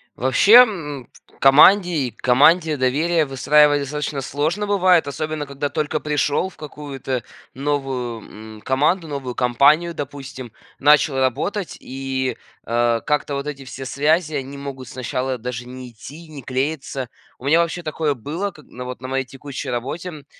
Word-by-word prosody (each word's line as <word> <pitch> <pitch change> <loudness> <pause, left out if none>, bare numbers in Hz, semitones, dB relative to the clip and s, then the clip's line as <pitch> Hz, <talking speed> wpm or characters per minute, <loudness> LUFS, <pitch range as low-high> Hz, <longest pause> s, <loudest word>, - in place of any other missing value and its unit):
Вообще, 130 - +3
м, 150 - -5 0.3
в - - -27
команде 175 +7 +6
и 140 -7 -1
к 110 - -33
команде 155 +6 +4
доверие 150 +5 +1
выстраивать 145 +2 +4
достаточно 150 0 -3
сложно 155 +10 -2
бывает, 185 -5 +3
особенно 155 +1 -3
когда 140 +1 -4
только 155 0 -2
пришел 150 +3 0
в - - -21
какую-то 140 -4 -5 0.3
новую, 125 -6 -4
м, - - -15
команду, 150 - +1
новую 140 -4 -5
компанию, 140 +7 +3
допустим. 135 -4 -7 0.3
Начал 150 0 +4
работать 165 - -1
и, 130 0 -3 0.3
э, 120 0 +1
как-то 150 -1 0
вот 140 +1 -4
эти 140 -2 -6
все 135 0 -8
связи, 155 +4 +1
они 140 0 -5
могут 135 -3 -7
сначала 130 +1 -3
даже 120 0 -5
не 125 0 -9
идти 145 +9 -11
и - - -17
не 145 - -8
клеиться. 135 0 -3 0.3
У 130 - -12
меня 160 +4 +4
вообще 170 +1 -2
такое 155 -1 -1
было 160 - -4
как 155 -4 -17
на, 125 - -9
вот, 125 0 -7
на 130 - -6
моей 135 0 -1
текущей 135 +1 -7
работе, 135 +9 -4
м. 150 -4 -11
140 Hz, 160 wpm, -21 LUFS, 130-155 Hz, 0.3 s, команде